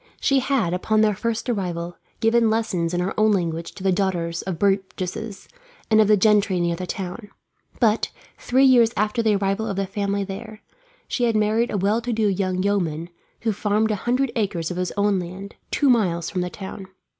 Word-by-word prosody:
She 275 -2 +3
had, 255 -10 0
upon 215 +4 +1
their 215 -1 +3
first 225 +3 -3
arrival, 175 -6 -2 0.3
given 225 0 +4
lessons 195 -7 0
in 175 0 0
her 185 +2 -1
own 215 0 +4
language 170 -3 -2
to 190 - -10
the 190 - +3
daughters 175 -3 -1
of 190 -3 -4
burgesses, 195 +2 -2 0.4
and 220 0 +6
of 215 - +3
the 210 0 +5
gentry 205 -2 +3
near 170 -1 0
the 180 +1 -6
town; 195 +4 -5 0.5
but, 225 -2 +2 0.3
three 260 +2 +3
years 240 -4 +6
after 210 +3 +1
the 220 -2 +2
arrival 195 +2 -1
of 200 - -2
the 195 +1 -1
family 200 +1 -2
there, 210 +3 -8 0.4
she 245 - 0
had 230 -2 +1
married 215 +3 +2
a - - -1
well 205 +4 +1
to 245 +1 -3
do 220 -1 +1
young 185 -1 0
yeoman 175 -5 -1 0.3
who 225 -2 0
farmed 210 +2 +1
a - - +1
hundred 245 +5 0
acres 190 -7 -1
of 180 - -4
his 180 0 -1
own 200 -1 +2
land, 185 +3 -7 0.2
two 285 - +1
miles 185 -9 +2
from 185 - -1
the 180 - -2
town. 190 0 -8
200 Hz, 200 wpm, -23 LUFS, 185-220 Hz, 0.5 s, and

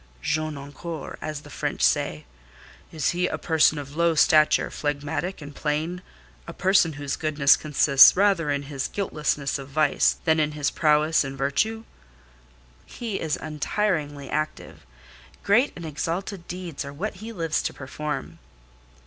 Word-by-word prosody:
"'Jeune 155 -1 -1
encore,' 145 +3 -7
as 155 -2 -5
the 145 - -14
French - - -3
say. 75 - +1 0.7
Is 155 -3 0
he 180 +1 0
a - - -3
person 160 -2 +3
of 145 0 -7
low 170 0 +2
stature, 155 0 +4
phlegmatic, 145 +4 -3
and 145 0 -9
plain. 155 +5 -2 0.5
A - - -7
person 185 -4 +3
whose 145 -1 -3
goodness 145 -3 +4
consists 145 0 +6
rather 190 -6 +3
in 140 0 -1
his 140 -1 -4
guiltlessness 150 -7 -2
of 135 0 -9
vice, 155 +2 +2
than 160 -1 +3
in 150 -1 0
his 145 -2 -1
prowess 155 0 +3
in 135 0 -6
virtue." 215 - 0 1.0
"He 225 -5 -5
is 155 -2 -1
untiringly 150 -2 -2
active. 155 - -4 0.6
Great 230 +8 +3
and 170 - -8
exalted 170 +5 -4
deeds 180 -4 -6
are 140 - -7
what 190 +7 -4
he 220 +4 -8
lives 165 -6 -1
to - - -2
perform." 130 - -6
155 Hz, 150 wpm, -25 LUFS, 145-175 Hz, 1.0 s, consists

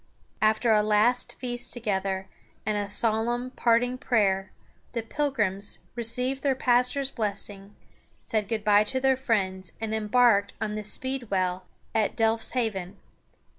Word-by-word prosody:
After 220 +2 +3
a 210 -1 +5
last 215 +4 +2
feast 245 -1 -3
together, 195 -4 -2 0.4
and 215 0 0
a 205 -1 -1
solemn 230 +4 0
parting 245 +1 +2
prayer, 195 -6 +1 0.4
the 230 -2 -2
Pilgrims 215 -7 -1 0.2
received 250 +3 -1
their 275 -2 +2
pastor's 255 +2 +2
blessing, 205 -2 -4 0.4
said 215 -2 -2
good 220 -1 -2
by 210 0 +5
to 260 +4 -1
their 265 0 +3
friends, 190 -8 -1
and 220 -1 -3
embarked 220 -1 +3
on 215 -1 -2
the 215 - -3
Speedwell 200 -6 -2 0.3
at 220 -2 +1
Delfs 225 0 +1
ha´ven. 205 -7 -2
220 Hz, 135 wpm, -27 LUFS, 205-245 Hz, 0.4 s, a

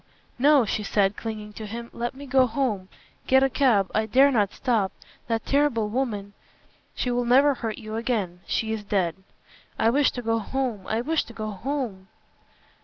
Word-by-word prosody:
no," 280 -1 +5
she 210 - -1
said, 200 -1 +1
clinging 215 -2 -6
to 215 0 -7
him, 235 +2 -7
"let 240 +2 -3
me 280 +1 -9
go 260 -1 +4
home. 220 -6 -2 0.4
Get 265 +1 +5
a 270 - +2
cab. 230 -10 +3
I 220 0 +1
dare 270 +5 +5
not 205 -6 +2
stop. 225 -7 0 0.4
That 225 -1 -1
terrible 275 -7 +2
woman 210 -5 -2 0.3
" - - -36
"She 250 - -1
will 245 0 +1
never 270 +4 +5
hurt 225 -4 -4
you 215 0 -7
again. 215 -7 -2
She 220 0 -1
is 215 -2 -4
dead." 190 -5 0 0.6
"I 225 - +3
wish 285 +2 +4
to 245 - -5
go 225 0 +1
home 235 -4 -3
I 220 +1 0
wish 315 +5 0
to 235 - -12
go 215 -1 -4
home." 225 -4 -4
230 Hz, 185 wpm, -25 LUFS, 210-265 Hz, 0.6 s, no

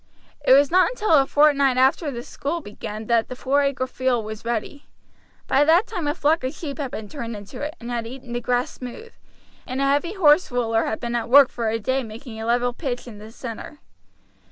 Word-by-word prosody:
It 260 - +6
was 280 +2 +5
not 365 -1 +5
until 435 -5 -2
a 275 -3 +5
fortnight 280 -3 +4
after 265 +4 +3
the 240 -3 -6
school 295 +7 -4
began 215 -4 -7
that 230 0 +2
the 255 - -5
Four 275 +3 +1
Acre 275 -2 0
Field 255 -3 -1
was 215 0 -7
ready. 235 +5 -4 0.6
By 275 - +3
that 330 +7 +4
time 360 -9 -4
a 290 - 0
flock 315 -2 +1
of 260 +4 -3
sheep 295 -3 -6
had 275 -3 -2
been 220 -3 -7
turned 235 -3 -6
into 205 +5 -9
it, 300 +1 -4
and 235 +1 -7
had 235 -1 -3
eaten 250 0 -9
the 240 - -2
grass 245 +1 0
smooth, 265 - -9 0.5
and 255 +1 -4
a 275 - +2
heavy 290 +6 +1
horse 325 -4 +4
roller 230 -2 0
had 220 - -2
been 235 0 -4
at 235 -1 -2
work 275 +1 +8
for 230 -2 -2
a 225 - 0
day 260 +5 -1
making 225 0 -9
a 225 - -4
level 245 +1 +1
pitch 250 -3 -4
in 220 -4 -10
the 215 +1 -11
center. 230 +5 -8
255 Hz, 225 wpm, -23 LUFS, 235-290 Hz, 0.6 s, work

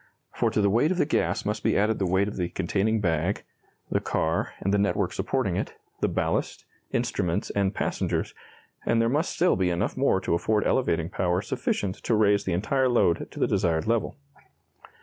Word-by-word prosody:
For - - +1
to 105 - 0
the 100 - +3
weight 120 +9 +3
of 185 - 0
the 180 - +3
gas 155 - 0
must 105 +1 -2
be - - +2
added 105 +2 +1
the 95 - +1
weight 95 +2 +2
of 105 - -5
the 90 -2 -2
containing 105 +5 0
bag, 85 +1 0 0.5
the - - +2
car, 80 +1 -1
and 100 - -1
the 105 - +3
network 100 0 0
supporting - - -1
it, - - -3 0.2
the - - +1
ballast, - - -2 0.3
instruments, 100 -6 -1
and 100 0 0
passengers, - - -1 0.5
and 115 - +2
there 115 0 +3
must 150 +7 +1
still 180 +2 +3
be 95 -1 +1
enough 85 0 -1
more - - +2
to - - -1
afford 105 +5 +1
elevating 85 -9 +1
power 90 0 0
sufficient 95 -2 -2
to 115 - 0
raise 105 -1 +3
the 95 - 0
entire 130 +9 +1
load 115 -8 +2
to - - -10
the - - +3
desired 80 -2 +1
level. 115 0 0
100 Hz, 195 wpm, -26 LUFS, 90-115 Hz, 0.5 s, the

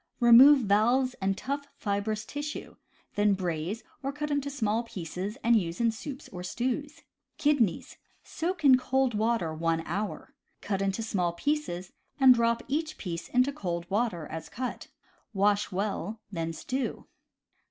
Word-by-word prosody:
— - - -45
Remove 265 +4 +9
valves 240 +5 +3
and 195 0 0
tough, 280 +1 -3
fibrous 210 +1 -2
tissue; 290 +1 -6 0.4
then 205 -1 +3
braise, 180 +3 -3 0.2
or 275 0 -2
cut 300 +1 -4
into 285 -1 0
small 225 -5 0
pieces 190 0 -5
and 235 0 +5
use 170 -1 -5
in 230 -1 +3
soups 265 +5 -8
or 180 - -7
stews. 270 - -3 0.3
Kidneys. 285 - +1 0.2
— - - -39 0.2
Soak 335 -1 -1
in 260 -2 +8
cold 265 -1 +1
water 215 -6 0
one 165 +1 0
hour. 205 +5 -4 0.3
Cut 195 -1 -2
into 195 +3 -1
small 180 -6 0
pieces, 185 - -2 0.3
and 265 -2 +9
drop 235 -1 +1
each 310 +3 -2
piece 170 -3 -5
into 255 +3 +2
cold 175 - -4
water, 200 -6 0
as 160 +1 -7
cut. 255 0 -5 0.5
Wash 205 +1 +2
well; 200 +2 -2
then 165 -3 -2
stew. 255 +10 -4
220 Hz, 150 wpm, -29 LUFS, 190-265 Hz, 0.5 s, Remove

